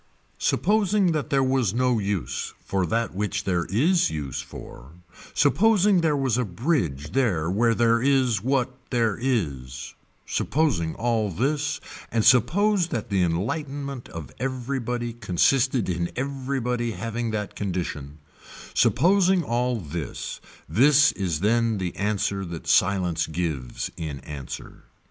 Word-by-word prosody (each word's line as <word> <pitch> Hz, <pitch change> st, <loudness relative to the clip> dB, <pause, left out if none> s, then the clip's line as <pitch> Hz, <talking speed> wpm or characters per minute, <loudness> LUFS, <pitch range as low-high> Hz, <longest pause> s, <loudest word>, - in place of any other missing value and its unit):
Supposing 205 Hz, -3 st, +2 dB
that 155 Hz, -3 st, -2 dB
there 135 Hz, -1 st, +3 dB
was 130 Hz, -6 st, +1 dB
no 125 Hz, -2 st, +2 dB
use 100 Hz, -4 st, -3 dB
for 95 Hz, -2 st, 0 dB
that 115 Hz, +5 st, -1 dB
which 105 Hz, +1 st, -2 dB
there 90 Hz, -4 st, 0 dB
is 155 Hz, -, +2 dB
use 75 Hz, -5 st, -4 dB
for, 65 Hz, +6 st, -11 dB, 0.4 s
supposing 200 Hz, +4 st, +4 dB
there 155 Hz, -3 st, +2 dB
was 130 Hz, -3 st, +1 dB
a -, -, +2 dB
bridge 90 Hz, -, -1 dB
there 95 Hz, -11 st, +1 dB
where 115 Hz, +3 st, +2 dB
there 115 Hz, 0 st, +3 dB
is 130 Hz, -6 st, +2 dB
what 130 Hz, +1 st, 0 dB, 0.2 s
there 115 Hz, -5 st, +1 dB
is, 70 Hz, -, -2 dB, 0.3 s
supposing 125 Hz, -, 0 dB
all 115 Hz, -3 st, 0 dB
this 145 Hz, -, -1 dB, 0.3 s
and 115 Hz, -2 st, +1 dB
suppose 180 Hz, -, +4 dB
that 115 Hz, -7 st, -4 dB
the 95 Hz, -2 st, +2 dB
enlightenment 135 Hz, -, -2 dB
of 80 Hz, -3 st, -8 dB
everybody 125 Hz, -2 st, -3 dB
consisted 120 Hz, +4 st, +2 dB
in 85 Hz, -1 st, -1 dB
everybody 130 Hz, -3 st, -2 dB
having 115 Hz, +1 st, -3 dB
that 105 Hz, -2 st, -3 dB
condition, 85 Hz, -7 st, -4 dB, 0.6 s
supposing 185 Hz, 0 st, +3 dB
all 125 Hz, -1 st, 0 dB
this, 80 Hz, -2 st, -6 dB, 0.3 s
this 140 Hz, -, +5 dB
is 90 Hz, -5 st, -2 dB
then 115 Hz, +1 st, +2 dB
the 90 Hz, -2 st, -3 dB
answer 100 Hz, -1 st, -1 dB
that 85 Hz, -3 st, -7 dB
silence 90 Hz, +3 st, +2 dB
gives 80 Hz, -7 st, -3 dB
in 80 Hz, -5 st, -5 dB
answer. 70 Hz, -4 st, -8 dB
115 Hz, 130 wpm, -25 LUFS, 90-135 Hz, 0.6 s, this